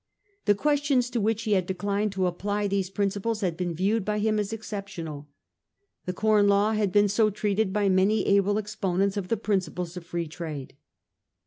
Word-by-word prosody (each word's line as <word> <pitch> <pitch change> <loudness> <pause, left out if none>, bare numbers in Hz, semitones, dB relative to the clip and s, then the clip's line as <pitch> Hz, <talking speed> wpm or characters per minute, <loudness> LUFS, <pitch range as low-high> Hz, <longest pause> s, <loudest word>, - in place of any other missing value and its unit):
The 205 - +4
questions 285 -1 +1
to 235 -2 0
which 220 +2 0
he 215 - -2
had 185 -3 +2
declined 200 +2 -1
to 190 -1 0
apply 205 +4 -1
those 195 -2 -1
principles 205 +3 -1
had 180 -4 0
been 175 -1 -3
viewed 200 +5 +1
by 210 +2 -1
him 215 0 +1
as 205 0 -2
exceptional. 195 -9 -6 0.8
The 180 - -1
Corn 210 +1 +3
Law 200 +2 +3
had 210 -3 +1
been 205 +1 +4
so 215 +2 +3
treated 210 0 0
by 205 0 +1
man/ 190 +1 +4
able 205 -1 +2
exponents 200 -2 -1
of 200 -3 -3
the 230 - 0
principles 185 -4 -2
of 180 - -7
Free 170 -1 -3
Trade. 155 -4 -7
200 Hz, 185 wpm, -26 LUFS, 185-215 Hz, 0.8 s, The